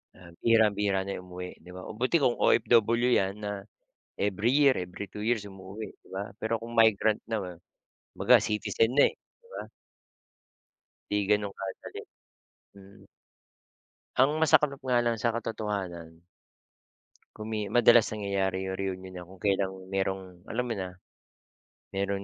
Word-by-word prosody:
ah, 85 -2 -14
bihirang-bihira 105 -4 +3
na 100 - -5
'yon 90 - -9
umuwi, 90 0 -8
'di 90 - -14
ba. 90 - -7
O - - -7
buti 130 +7 +1
kung 120 - +3
OFW 115 +1 +4
'yan 95 -4 +2
na, 105 - -2 0.7
every 105 +5 +1
year, 140 -2 +5
every 90 +2 -6
2 105 +2 -7
years 115 -2 +1
umuuwi, 95 +3 -8 0.2
'di - - -21
ba. 95 +1 -2
Pero 115 0 -2
kung 115 +1 -8
migrant 110 -1 +4
na 115 0 -2
nga, 90 -2 -6 0.6
kumbaga - - +6
citizen 110 +2 0
na, 145 - +6
eh, - - -16
'di 470 - -29
ba. - - -6 1.5
'Di 105 0 +1
gano'n 105 -1 +2
kadali. 95 -1 -6 0.8
Mm. 100 0 -16 1.1
Ang 140 +4 +3
masaklap 150 -3 +4
nga 125 -2 +3
lang 120 -1 0
sa 115 0 0
katotohanan. 95 -8 -4 1.1
Kumi 110 0 -4 0.2
madalas 120 -1 +7
nangyayari 100 -3 -1
'yong 95 0 -4
reunion 95 -1 -5
na 90 -1 -8
kung 95 +1 -15
kailang 95 -1 +1 0.2
merong, 95 0 0 0.2
alam 125 +2 -2
mo - - 0
na. 95 -1 -3 1.1
Meron 100 0 -1
105 Hz, 150 wpm, -28 LUFS, 95-115 Hz, 1.5 s, madalas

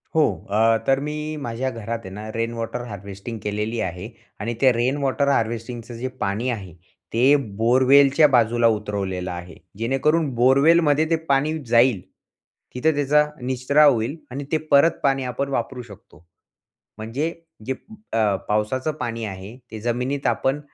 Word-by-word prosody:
हो. 160 - +5 0.3
अ, 115 +2 +3
तर 135 0 +3
मी 150 +1 -4
माझ्या 120 +3 -2
घरात 115 -1 -5
आहे 95 - -8
ना, 105 +1 -7
रेन 115 +1 -1
वॉटर 115 +1 -4
हार्वेस्टिंग 100 +2 -8
केलेली 105 +2 -2
आहे, 90 +4 -4 0.3
आणि 115 +3 -2
त्या 130 -1 +6
रेन 125 +4 0
वॉटर 140 +1 +1
हार्वेस्टिंगचं 115 -1 -2
जे 125 +2 -3 0.2
पाणी 105 +6 -1
आहे, 100 -8 -5 0.4
ते 130 +5 +5 0.2
बोअरवेलच्या 135 +5 +5
बाजूला 120 -3 +3
उतरवलेलं 100 -4 -2
आहे, 90 0 -8 0.2
जेणेकरून 135 +7 +1
बोरवेलमध्ये 145 +5 +4
ते 165 - +3
पाणी 145 +3 +2
जाईल. 120 -3 +4 0.7
तिथं 160 +6 +2
त्याचा 145 +1 +3 0.2
निचरा 130 +4 +2
होईल 125 0 +2 0.2
आणि 140 +3 -4
ते 160 - +3
परत 140 +4 +6
पाणी 135 -1 +2
आपण 130 +2 -3
वापरू 125 -1 -3
शकतो. 100 -7 -16 0.7
म्हणजे 130 +10 -3 0.3
जे 130 - -1 0.4
अ, 110 -3 +2
पावसाचं 110 +8 0
पाणी 115 -1 -3
आहे, 100 +3 -8
ते 110 - -6
जमिनीत 125 +4 -1
आपण 135 +2 0
120 Hz, 150 wpm, -22 LUFS, 110-140 Hz, 0.7 s, त्या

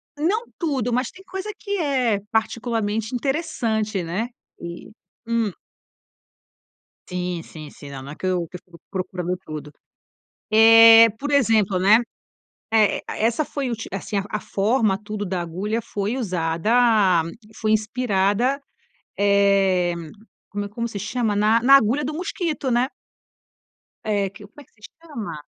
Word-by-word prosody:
Não 375 +10 0
tudo, 265 - -1
mas 250 +1 0
tem 380 - -16
coisa 385 +3 -6
que 405 -2 -3
é, 255 -9 +1
particularmente, 225 0 -1
interessante, 235 - -1
né, 190 +8 -2 0.3
e, 170 0 -8 0.4
hum. 230 -3 0 1.6
Sim, 180 -1 -3
sim, 155 -3 -11
sim, 145 - -12
não 135 -1 -7
não 140 - -8
é - - -8
que - - -7
eu 180 -2 0
que 180 - -8
eu - - -18
fico 170 -2 -17
procurando 180 -1 -3
tudo, 150 -1 -7 0.8
eh, 225 +1 +9
por 290 +3 -4
exemplo, 220 -8 +3
né, 205 +5 +6 0.8
eh, 215 -2 +3
essa 235 +7 0
foi 275 -3 -3
uti 225 -2 -4
assim, 200 +2 -4
a 210 - -3
forma 205 0 +1
tudo 210 0 -5
da 185 -2 -2
agulha 195 +7 -3
foi 210 +2 -3
usada 190 0 +2 0.3
foi 215 -1 -1
inspirada, 220 +3 +1 0.6
eh, 195 -3 +3 0.6
como 205 0 -4
é, - - -7
como 235 +3 -3
se 210 - -7
chama? 210 +1 -1
Na 215 +3 +3
na 270 +3 +7
agulha 270 +3 +3
do 300 +2 -3
mosquito, 330 -6 -2
né. 245 +2 +2 1.2
É, 205 -3 0
que 200 +2 -13
como 290 +8 -15
é - - -13
que - - -38
se 210 - -30 0.2
chama? 230 - -7
215 Hz, 145 wpm, -22 LUFS, 190-245 Hz, 1.6 s, eh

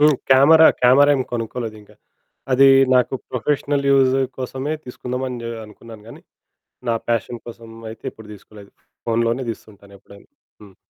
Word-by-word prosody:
హ్మ్. 150 -2 +4
Camera 155 +5 +7 0.2
camera 140 +4 +5
ఏమి 130 - -2
కొనుక్కోలేదింకా. 115 -2 -6 0.6
అది 135 +1 +6 0.3
నాకు 125 +1 +2 0.2
ప్రొఫెషనల్ 140 +2 -1
యూజ్ 135 -1 +3 0.2
కోసమే 130 +3 -4
తీసుకుందామని 125 0 -5
ఆహ్, 115 - -7
అనుకున్నాను 110 0 -14
కానీ - - -13 0.7
నా 115 - +1
పాషన్ 115 0 -3
కోసం 115 0 -11 0.2
అయితే 115 - -14
ఎప్పుడు 110 -1 -15
తీసుకోలేదు 100 0 -16 0.3
ఫోనులోనే 115 +2 0
తీసుతుంటాను 100 -2 -15
ఎప్పుడైనా. 100 +1 -18 0.3
హ్మ్. 100 -3 -16
120 Hz, 130 wpm, -20 LUFS, 110-135 Hz, 0.7 s, Camera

